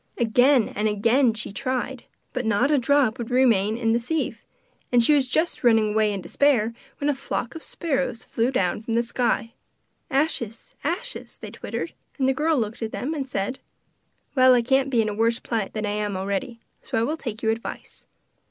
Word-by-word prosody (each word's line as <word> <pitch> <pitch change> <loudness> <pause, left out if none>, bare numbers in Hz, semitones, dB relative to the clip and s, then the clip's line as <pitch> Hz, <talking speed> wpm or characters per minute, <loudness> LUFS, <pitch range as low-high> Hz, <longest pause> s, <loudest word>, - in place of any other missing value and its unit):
Again 245 +2 +4
and 210 +1 -1
again 230 +4 +3
she 215 - -5
tried, 255 +3 -3 0.3
but 250 - -1
not 225 +6 +2
a 290 - +4
drop 260 -2 +2
would 235 - -4
remaining 230 -5 +3
in 225 -1 +1
the 235 - +2
sieve, 310 +7 -2 0.5
and 245 -1 +5
she 300 - +5
was 275 -3 +3
just 315 +7 0
turning 225 -4 +4
away 215 0 +2
in 200 -2 -3
despair 235 -2 +2 0.2
when 285 - -2
a 295 - +3
flock 260 -3 -4
of 325 - -8
sparrows 265 -9 -2
flew 230 +2 0
down 200 -7 0
from 225 0 -2
the 235 - +3
sky. 235 -1 -1 0.6
'Ashes! 265 -6 -1
ashes!' 385 - -3
they - - -9
twittered; - - -5 0.2
and 265 -2 +2
the 265 - +3
girl 310 +3 +1
looked 225 -1 -2
at 220 -1 -3
them 290 +6 -3
and 275 -4 -4
said: 225 +4 -2 0.7
'Well, 255 -2 +6
I 240 - +3
can't 265 +2 +2
be 235 -4 +3
in 215 - -1
a - - -3
worse 230 +2 +2
plight 225 -5 -3
than 215 -1 -2
I 205 - -1
am 210 -2 -2
already, 200 +5 -3 0.2
so - - -3
I 225 - +2
will 300 +7 0
take 235 -8 -6
your 220 - +3
advice. 225 +1 -5
240 Hz, 200 wpm, -24 LUFS, 220-270 Hz, 0.7 s, Well